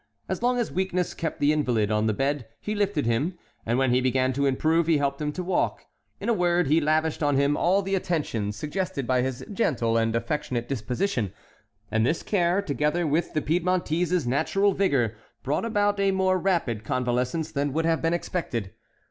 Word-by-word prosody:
As - - -3
long 245 +1 +2
as 240 -3 -1
weakness 180 -1 -1
kept 165 - -4
the 145 +1 +3
invalid 120 -8 +1
on 105 +1 +2
the 110 - +2
bed, 135 -1 -1
he 210 - -3
lifted 200 - 0
him, 140 +11 0 0.3
and 120 +2 +1
when 130 -1 +2
he 125 +1 +3
began 130 0 +1
to 140 +2 +1
improve 160 +5 +2
he 165 -2 +4
helped 140 0 -1
him 150 0 -1
to 180 - -4
walk; 180 0 -1 0.3
in - - -5
a 235 - +3
word, 175 -3 +2
he 155 +4 +3
lavished 155 +1 +1
on 145 -2 +2
him 140 +1 +3
all 190 +5 +2
the 195 +1 -3
attentions 150 - -1
suggested 150 - -3
by 125 0 +2
his 130 -1 -3
gentle 120 - +1
and 115 0 +1
affectionate 120 -2 -2
disposition, 125 - -1 0.6
and 110 0 +2
this 160 +8 0
care, 185 0 +1
together 150 +1 0
with 155 +3 0
the 155 - +1
Piedmontese's 175 0 +1
natural 195 +10 +2
vigor, 135 - +1 0.3
brought 145 - -1
about 205 -2 +1
a 195 0 +3
more 190 -1 +2
rapid 165 - 0
convalescence 125 +7 -1
than 145 -2 -1
would 160 +4 0
have 165 -1 +1
been 165 +1 +1
expected. 120 - -3
150 Hz, 190 wpm, -26 LUFS, 130-180 Hz, 0.6 s, he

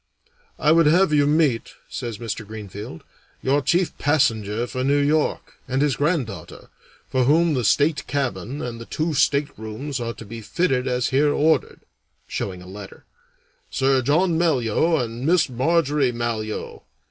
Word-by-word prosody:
"I 150 - +3
would 165 -1 +5
have 170 +1 +4
you 145 -1 +4
meet," 150 -6 +1
says 120 -4 -5
Mr. 110 -1 -5
Greenfield, 105 -4 -8 0.4
"your 140 +2 +2
chief 175 +5 +1
passenger 115 -6 +1
for 130 +1 -4
New 140 +2 +2
York, 145 +2 0
and 130 +1 -1
his 145 -3 +1
granddaughter, 145 - -3 0.4
for 130 -1 +1
whom 160 +4 +3
the 125 -3 0
state 145 +6 +2
cabin 140 -1 -3
and 115 -1 -5
the 115 - -9
two 155 +1 -2
staterooms 140 -2 -1
are 115 -1 -4
to 115 - -10
be 115 +3 -8
fitted 130 - 0
as 125 -1 0
here 145 +2 +3
ordered 155 +2 +1 0.4
[showing 90 -2 -5
a - - -13
letter] 95 +1 -11 0.6
Sir 135 -1 +2
John 160 +6 +2
Malyoe 160 0 +2
and 115 +1 -6
Miss 165 +2 +3
Marjorie 145 +1 +1
Malyoe. 115 -2 -4
135 Hz, 150 wpm, -23 LUFS, 115-150 Hz, 0.6 s, would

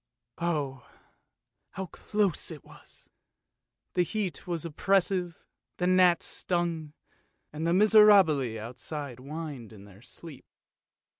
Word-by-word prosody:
Oh! 145 -7 -2 0.8
how 190 - -4
close 200 +1 -1
it 155 -4 -9
was! - - -13 0.8
The 180 - +2
heat 190 0 -3
was 170 -2 -3
oppressive, 180 +1 +1 0.4
the 180 - -1
gnats 180 -2 +4
stung, 170 -4 -2 0.6
and 155 +2 -3
the - - +2
miserabili 195 - +5
outside 125 +4 -7
whined 145 -4 -7
in 100 -2 -13
their 100 0 -16
sleep. 145 +3 -11
165 Hz, 105 wpm, -28 LUFS, 140-185 Hz, 0.8 s, miserabili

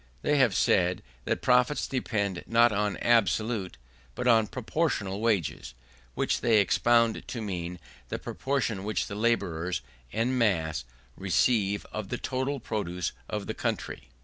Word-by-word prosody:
They 150 - +2
have 120 -8 +4
said 90 0 +2 0.2
that - - -1
profits 125 +3 +3
depend 100 -8 -2
not 115 +1 +5
on 105 -1 0
absolute, 110 - +1 0.4
but 125 - -2
on 110 -3 +5
proportional 110 - -2
wages: 95 - -1 0.4
which - - 0
they 115 -2 +4
expounded 115 +3 +3
to 120 - -5
mean 90 -4 -4 0.3
the - - -2
proportion 120 -8 -2
which 105 +1 -1
the - - -7
labourers 90 - 0 0.3
en 120 - 0
masse 85 - +1 0.3
receive 100 +1 +1
of 110 -3 -5
the 125 - -2
total 130 +3 -2
produce 90 -6 -3 0.2
of 105 -1 -3
the - - -3
country. - - -4
110 Hz, 140 wpm, -28 LUFS, 95-120 Hz, 0.4 s, not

